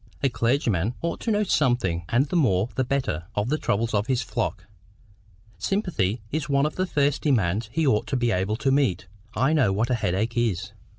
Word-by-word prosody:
"A 135 - +4
clergyman 115 - 0
ought 170 - -2
to - - -3
know 210 0 +2
something, 120 - +1
and 120 +4 +3
the 150 - -4
more 110 - +2
the 130 - 0
better, 125 - -2
of 105 +3 0
the 155 +2 0
troubles 115 +3 0
of 105 +1 +1
his 130 -2 +1
flock. 105 -6 -3 0.9
Sympathy 140 - -1
is 150 0 -2
one 140 0 +3
of 150 - -2
the 185 0 -1
first 145 -3 +1
demands 110 - +1
he 160 +3 0
ought 110 -6 +2
to 135 - -1
be 120 -1 +1
able 95 +2 0
to 135 +3 0
meet—I 110 - 0
know 130 -10 +3
what 110 +6 0
a - - +3
headache 110 +1 -1
is." 105 -5 -1
120 Hz, 195 wpm, -25 LUFS, 105-140 Hz, 0.9 s, A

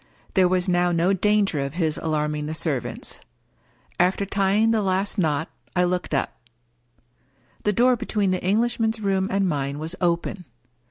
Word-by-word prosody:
There 185 -2 +5
was 180 0 0
now 175 -1 +2
no 175 +3 +2
danger 200 -4 +2
of 140 +2 -3
his 160 -3 0
alarming 150 -1 -1
the 155 - -4
servants. 150 -6 -3 0.8
After 185 +3 +2
tying 200 +3 +2
the 225 -1 +2
last 195 +2 -1
knot, 155 -2 +1 0.3
I 180 - +3
looked 180 -3 -1
up. 135 - -2 1.2
The 210 - +3
door 250 +4 +4
between 210 -4 -1
the 185 - -1
Englishman's 225 +3 +1
room 195 -2 0
and 195 0 +1
mine 140 -3 -2
was 160 +3 -5
open. 175 +1 -1
185 Hz, 155 wpm, -24 LUFS, 160-200 Hz, 1.2 s, There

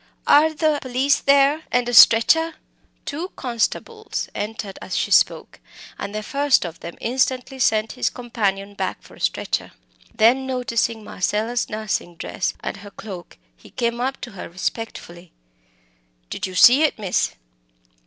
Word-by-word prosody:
Are 310 +2 +5
the 310 -1 +1
police 260 +2 +1
there 280 +2 +4
and 245 -1 +1
a 245 - -2
stretcher?" 320 +9 +6 0.5
Two 315 +5 -4
constables 270 - -3
entered 205 -2 -5
as - - -5
she - - -1
spoke, - - +2 0.4
and 200 +1 -5
the 215 - -3
first 280 -2 +2
of 170 -1 -7
them 170 - -8
instantly 260 +2 -1
sent 220 -2 +2
his 250 - -1
companion 205 -5 -3
back 190 -2 -4
for - - -16
a - - -16
stretcher. - - -2 0.4
Then, 250 +4 +3
noticing 235 -3 -1
Marcella's 215 +5 -2
nursing 215 -5 -3
dress 185 - -3
and - - -5 0.2
cloak, 190 -5 -9 0.2
he - - -17
came 235 0 -2
up 265 +2 -2
to 240 - -7
her 195 - -8
respectfully. 175 -2 -6 1.0
"Did 205 - -3
you 185 - -9
see 250 +9 +7
it, 310 - +2
miss?" 200 -4 -1
235 Hz, 145 wpm, -22 LUFS, 205-265 Hz, 1.0 s, see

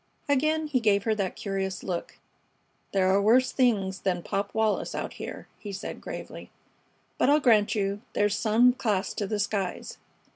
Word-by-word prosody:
Again 310 +3 +2
he 290 -4 +1
gave 205 -3 +2
her 220 - +1
that 195 -3 -2
curious 195 -1 -3
look. 180 -3 -4 0.7
"There 190 -1 +2
are 200 - +3
worse 245 +5 +4
things 200 -7 +1
than 180 -3 -1
Pop 200 +1 -2
Wallis 220 -1 0
out - - -4
here," - - -8
he 205 - -7
said, 195 +1 -6
gravely. - - -8 0.7
"But - - +4
I'll 295 +1 +5
grant 220 -7 +3
you 200 0 -1
there's 205 0 +2
some 235 +3 +4
class 210 -6 -1
to 205 - -3
the 215 - -1
skies. 200 -2 -3
205 Hz, 170 wpm, -27 LUFS, 195-240 Hz, 0.7 s, I'll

